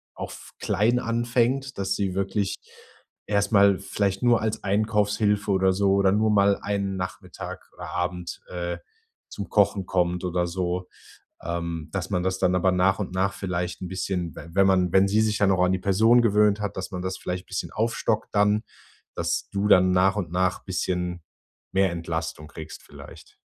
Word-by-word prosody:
auch - - -5
f - - -12
klein 120 +4 +2
anfängt, 120 +3 0
dass 95 0 0
sie 95 -3 -1
wirklich 100 +1 -1 0.7
erstmal 100 -1 +3
vielleicht 100 0 -1
nur 120 -1 +4
als 110 0 -2
Einkaufshilfe 105 0 +1
oder 95 -1 +3
so 95 0 +2
oder 100 -1 +3
nur 110 +2 +2
mal 100 -1 +4
einen 100 -1 -2
Nachmittag 90 0 -7
oder - - -8
Abend, 90 -1 -3
äh, 85 -1 -4 0.5
zum 100 - -7
Kochen 100 -2 +2
kommt 90 -1 0
oder 90 0 0
so, 90 0 -3 0.5
ähm, 85 -2 -4
dass 95 0 -3
man 90 -1 0
das 95 0 -1
dann 90 -1 +2
aber 90 +1 +3
nach 90 +1 +3
und 95 -3 -4
nach 95 +2 +1
vielleicht 90 -2 -3
'n 90 - -4
bisschen, 90 -3 -3
w - - -9
wenn 95 +1 +4
man 90 -2 +3
wenn 95 +1 +5
sie 105 +2 +2
sich 110 0 0
ja 100 -1 +4
auch 95 -1 +3
an 90 - +1
die 95 - 0
Person 110 +6 +4
gewöhnt 105 -1 +3
hat, 100 - -4
dass 95 - -4
man 90 -1 -4
das 95 0 -3
vielleicht 90 0 -4
bisschen 95 - -4
aufstockt 110 0 -1
dann, 105 +1 +3 0.5
dass - - -2
du 100 +1 0
dann 90 -2 +5
nach 95 +2 +3
und 90 -5 -3
nach 90 0 0
bisschen 90 -2 -2 0.5
mehr 95 -1 +3
Entlastung 80 -2 -4
kriegst 80 0 -9
vielleicht. - - -13
95 Hz, 180 wpm, -25 LUFS, 90-105 Hz, 0.7 s, wenn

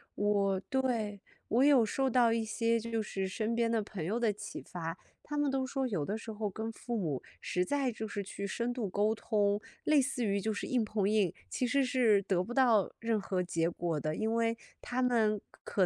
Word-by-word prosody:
我 200 -2 +2
对， 225 -4 -1 0.3
我 240 +4 +3
有 275 -5 +6
受 265 +5 0
到 240 -2 +4
一 230 -1 +1
些， 230 +2 +1
就 230 0 -2
是 195 -2 -3
身 220 +4 -1
边 230 -1 +2
的 225 -1 +2
朋 205 -4 -6
友 215 +7 0
的 230 -3 +2
启 210 +1 -7
发。 165 -1 -5 0.3
他 295 - -4
们 290 -1 +2
都 265 -1 0
说 265 +1 -1
有 190 -11 -1
的 200 +8 -2
时 225 0 -7
候 210 -1 -2
跟 220 +3 -4
父 235 +1 -4
母， 155 -10 -1 0.2
实 180 - 0
在 275 +3 0
就 220 -1 -5
是 205 -1 -4
去 200 +1 -5
深 235 +4 -2
度 235 -5 -2
沟 210 +4 +2
通， 205 -2 +1 0.2
类 305 -2 +5
似 255 -3 -1
于 200 -1 +1
就 220 +3 0
是 210 - -3
硬 250 -3 +1
碰 210 -2 0
硬， 205 -4 +3 0.2
其 250 - 0
实 275 +3 +2
是 245 -5 +4
得 185 -2 +1
不 215 - -8
到 240 -6 +4
任 225 -2 0
何 185 -1 -1
结 165 -2 0
果 170 -2 -2
的。 155 +1 -2
因 220 +1 0
为 230 0 +1 0.2
他 255 +1 -1
们 220 -4 +3 0.2
可 190 - +1
220 Hz, 235 characters per minute, -32 LUFS, 200-240 Hz, 0.3 s, 有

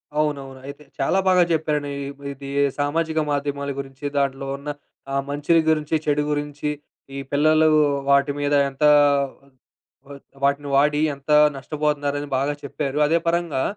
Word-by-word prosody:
అవునవును. 140 -3 -2
అయితే 140 +1 -9 0.2
చాలా 140 +8 +2
బాగా 185 -1 +5
జెప్పారండి. 150 -3 -1 0.2
ఇప్పుడిది 140 0 -8 0.3
సామాజిక 160 +2 0
మాధ్యమాల 140 0 -2
గురించి, 135 0 -8
దాంట్లో 135 -1 -1
ఉన్న 140 +1 -8 0.4
ఆ - - 0
మంచిని 150 +3 +2
గురించి, 155 0 +1
చెడు 150 -1 +1
గురించి, 145 0 -3 0.5
ఈ - - -4
పిల్లలు 155 +2 +4 0.4
వాటిమీద 145 +1 +2 0.2
ఎంత 135 +2 -6 1.6
వాటిని 140 +1 +1
వాడి 150 +2 +3
ఎంత 140 +2 -6 0.3
నష్టపోతున్నారని 145 0 -2
బాగా 140 +2 0
చెప్పారు. 140 0 -4
అదే 165 +3 +3
పరంగా 170 -5 0
145 Hz, 120 wpm, -22 LUFS, 140-150 Hz, 1.6 s, బాగా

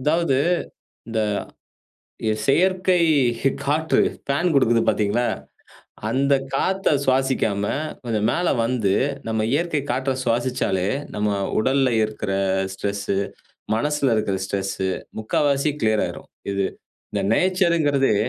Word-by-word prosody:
அதாவது 150 0 +2 0.7
இந்த, 110 -1 -1 1.1
ய 110 - +3
செயற்கை 185 +4 +3 0.4
ஹி 135 - +3
காற்று, 155 +3 +2 0.3
ஃபேன் 145 +6 +1
கொடுக்குது 120 -4 +4
பாத்தீங்களா? 110 +3 +1 0.8
அந்த 140 +3 +2 0.2
காத்த 190 +7 0 0.2
சுவாசிக்காம, 130 -6 +1 0.4
கொஞ்சம் 110 -3 0
மேல 175 0 0 0.2
வந்து, 115 -5 +1 0.4
நம்ம 110 -1 0
இயற்கை 155 0 +1
காற்ற 130 +2 0
சுவாசிச்சாலே 115 -6 0 0.3
நம்ம 105 0 0 0.3
உடல்ல 130 +3 +2
இருக்குற 105 -2 -4 0.4
ஸ்ட்ரெஸ்ஸு, 100 0 -2 0.6
மனசுல 140 +1 +1
இருக்குற 105 -3 0
ஸ்ட்ரெஸ்ஸு 95 -1 -2 0.3
முக்காவாசி 140 +6 +1
கிளியர் 110 -1 +2
ஆயிரும். - - -8 0.2
இது, 100 -1 0 0.5
இந்த - - -1
நேச்சர்ங்குறதே, 170 - +2
130 Hz, 105 wpm, -22 LUFS, 110-150 Hz, 1.1 s, கொடுக்குது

